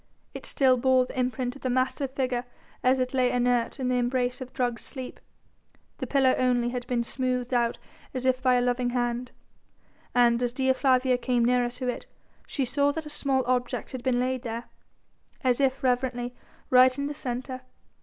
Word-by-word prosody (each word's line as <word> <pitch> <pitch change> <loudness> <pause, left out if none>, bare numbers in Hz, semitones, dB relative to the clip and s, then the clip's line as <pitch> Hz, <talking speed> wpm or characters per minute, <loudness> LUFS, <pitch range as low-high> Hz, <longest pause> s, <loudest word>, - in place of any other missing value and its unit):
It - - -7
still 260 -2 +3
bore 260 0 +3
the 255 - -6
imprint 250 0 -1
of 280 - -13
the 255 - -1
massive 255 +2 0
figure 255 -2 -1 0.4
as 255 +1 +4
it 255 0 -1
lay 255 -1 +3
inert 245 +1 +1
in 255 - -1
the 250 0 +2
embrace 250 +1 0
of 255 0 -7
drugged 245 -2 -1
sleep. 260 -3 -7 0.8
The - - -3
pillow 270 -2 +3
only 245 -1 +2
had 245 0 -4
been 245 -1 0
smoothed 250 0 -2
out 235 -1 +1 0.3
as 255 -1 -4
if 260 0 +2
by 255 -1 +4
a 245 - +3
loving 245 0 +1
hand, 240 +1 -1 0.8
and 240 -1 +4
as 245 -1 0
Dea 260 0 +2
Flavia 255 -1 +2
came 245 -1 +1
nearer 245 0 +2
to 250 +1 -5
it 245 - -3 0.4
she 275 - -1
saw 285 +3 +2
that 320 0 -5
a 300 - -8
small 270 -3 0
object 245 0 -1
had 255 - -5
been 245 -1 +1
laid 255 0 0
there, 230 -1 -4 0.8
as 255 +1 +2
if 270 -1 +1
reverently, 245 -1 0 0.4
right 255 +1 +6
in 280 - -2
the 295 - -3
centre. 255 -1 -5
255 Hz, 190 wpm, -27 LUFS, 245-260 Hz, 0.8 s, right